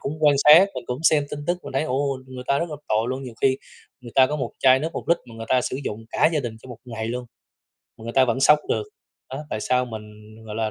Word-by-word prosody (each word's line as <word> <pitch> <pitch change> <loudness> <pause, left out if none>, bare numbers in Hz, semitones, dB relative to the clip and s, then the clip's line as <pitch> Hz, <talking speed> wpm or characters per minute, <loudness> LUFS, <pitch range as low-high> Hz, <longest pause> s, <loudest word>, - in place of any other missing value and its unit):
cũng 140 - -3
quan 150 -2 +5
sát, 160 +6 +9
mình 125 - -6
cũng 125 +1 -3
xem 155 -3 +4
tin 145 0 -6
tức, 175 +1 0
mình - - -7
thấy, 135 - +1
ồ, 140 -1 -1
người 130 -1 -9
ta 140 - +2
rất 170 +1 -3
là 150 - -5
tội 110 +2 +1
luôn, 130 +1 -3
nhiều 125 -3 -8
khi 130 -1 +4 0.4
người 120 -2 -11
ta 130 - +6
có 150 - -3
một 130 -5 -3
chai 130 0 +5
nước 160 +2 -3
1 - - -6
lít 170 0 +4
mà 115 - -12
người 115 0 -8
ta 130 - +3
sử - - -3
dụng 110 +2 -5
cả - - +3
gia 155 - +1
đình 120 -4 -5
cho - - -13
một 120 -2 -9
ngày 115 -3 -5
luôn, 125 +1 -4 0.7
mà - - -13
người 115 - -5
ta 130 - +5
vẫn 125 +1 -1
sống 150 +2 +6
được. - - 0 0.5
Đó, 135 +3 -6
tại 110 - -3
sao 125 +3 +1
mình, 110 -3 -7 0.4
gọi 105 -1 -7
là, 110 0 -1
130 Hz, 285 wpm, -23 LUFS, 115-145 Hz, 0.7 s, sát